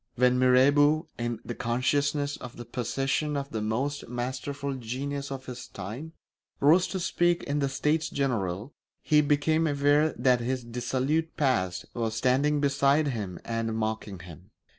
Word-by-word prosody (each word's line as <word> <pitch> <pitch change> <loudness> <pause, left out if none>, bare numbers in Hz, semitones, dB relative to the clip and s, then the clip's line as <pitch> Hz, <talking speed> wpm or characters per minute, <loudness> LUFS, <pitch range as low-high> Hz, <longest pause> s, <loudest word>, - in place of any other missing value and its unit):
When 125 +1 +3
Mirabeau, 145 +4 +4
in 120 -1 -2
the 120 - -4
consciousness 140 +5 0
of 125 -1 -10
the 120 - -7
possession 135 +5 -1
of 140 0 -4
the 110 - -2
most 130 +7 -2
masterful 130 +3 -3
genius 135 +3 -4
of 130 -1 -6
his 125 0 -7
time, 115 - -7 0.5
rose 165 +6 +5
to 190 - -3
speak 175 0 +1
in 145 +1 -1
the 140 -1 +1
States 150 +4 0
General, 115 -4 -2 0.3
he 150 -1 +4
became 155 +2 +2
aware 145 +1 +3
that 125 0 +3
his 125 +1 -2
dissolute 130 +7 -1
past 95 -11 0
was 115 -2 -2
standing 135 +5 +2
beside 140 +1 +3
him 100 -8 -4
and 115 -1 -2
mocking 110 -2 -3
him. 90 +2 -12
130 Hz, 150 wpm, -28 LUFS, 120-145 Hz, 0.5 s, rose